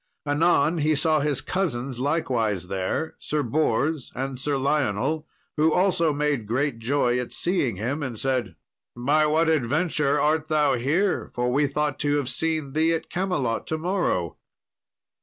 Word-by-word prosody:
Anon 155 +2 +2
he 155 +1 +2
saw 155 +1 +2
his 145 -2 0
cousins 135 -8 -2
likewise 115 - 0
there, 95 +11 -2
Sir 150 -1 -1
Bors 145 +2 0
and 135 0 -3
Sir 140 +1 0
Lionel, 140 +2 0 0.3
who 155 +1 +4
also 180 -2 +2
made 145 -6 -1
great 125 +1 -1
joy 125 0 +1
at 125 - -5
seeing 170 - 0
him, 125 +10 -3
and 130 -5 -4
said, 130 +1 -1 0.4
"By 145 +6 +2
what 160 +2 +2
adventure 150 0 +1
art 155 +1 +1
thou 150 -3 +2
here, 155 +11 0
for 125 0 0
we 145 +2 +3
thought 145 0 -1
to 145 0 +1
have 140 -3 -1
seen 160 -4 -2
thee 160 +2 +2
at 160 - -6
Camelot 150 - -1
to 160 - -1
morrow?" 160 - -1
145 Hz, 155 wpm, -25 LUFS, 125-155 Hz, 0.4 s, who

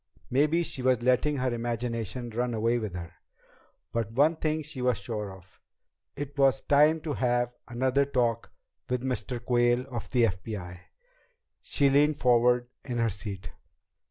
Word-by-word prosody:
Maybe 150 +6 +3
she 135 - -4
was 125 -2 +2
letting 130 +4 +2
her 130 -1 0
imagination 120 0 -3
run 120 +1 -1
away 115 +2 +1
with 105 -5 -5
her. 85 -1 -7 0.8
But 115 -2 -1
one 150 +6 +4
thing 155 0 -1
she 145 -3 -7
was 125 -3 +2
sure 105 -1 -4
of. 95 0 -16 0.5
It 145 0 -6
was 135 -1 +4
time 150 +3 +4
to 150 -2 -3
have 120 -2 0
another 130 +3 +1
talk 120 -4 0 0.4
with 125 0 -1
Mr. 125 -1 -2
Quayle 120 0 +2
of 120 -2 -5
the 125 -2 +2
FBI! 95 -3 -3 0.8
She 140 -1 +2
leaned 145 +2 +4
forward 120 -1 +3
in 125 -3 -4
her 115 -1 +1
seat. 95 -4 -7
120 Hz, 155 wpm, -28 LUFS, 115-135 Hz, 0.8 s, one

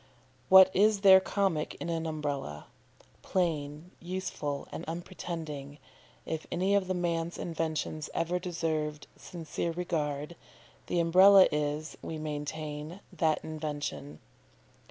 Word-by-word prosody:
What 190 -1 +8
is 205 +1 +4
there 190 -1 +9
comic 190 -5 -1
in - - -6
an 165 -1 -2
Umbrella? 145 - -4 0.6
Plain, 160 -2 -2
useful, 170 -5 -4
and - - -6
unpretending, 160 -4 -6 0.5
if 160 -1 -4
any 190 +3 +1
of 195 -2 +2
man's 170 -1 -1
inventions 155 -2 -3
ever 170 +2 0
deserved 155 -4 -2
sincere 170 0 -5
regard, 155 -3 -3 0.5
the 175 - 0
Umbrella 185 +3 +7
is, 150 +1 -2
we 160 - -5
maintain, 150 +2 -5
that 160 -2 +1
invention. 145 - -5
160 Hz, 110 wpm, -30 LUFS, 150-180 Hz, 0.6 s, there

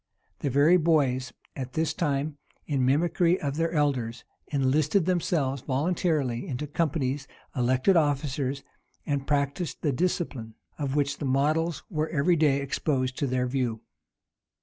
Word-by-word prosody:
The 140 - -1
very 145 +7 +5
boys, 140 -7 +2 0.2
at 130 -1 -5
this 160 -2 0
time, 145 -1 -1 0.3
in 140 -4 0
mimicry 170 +6 +2
of 140 -1 -2
their 165 0 +1
elders, 130 -7 0 0.2
enlisted 145 +6 +2
themselves 160 -7 0
voluntarily 145 -3 0
into 135 +2 -3
companies, 145 -3 -1 0.3
elected 130 +8 +3
officers, 140 -3 0 0.4
and 140 -2 -2
practised 145 +3 -1
the 150 - +2
discipline, 130 -7 -2 0.2
of 140 -2 -2
which 145 -1 0
the 145 - -3
models 155 +5 +1
were 155 -4 -2
every 165 +3 +2
day 145 -3 +3
exposed 130 -2 -1
to 140 - 0
their 125 0 0
view. 125 -3 -1
140 Hz, 135 wpm, -27 LUFS, 130-160 Hz, 0.4 s, very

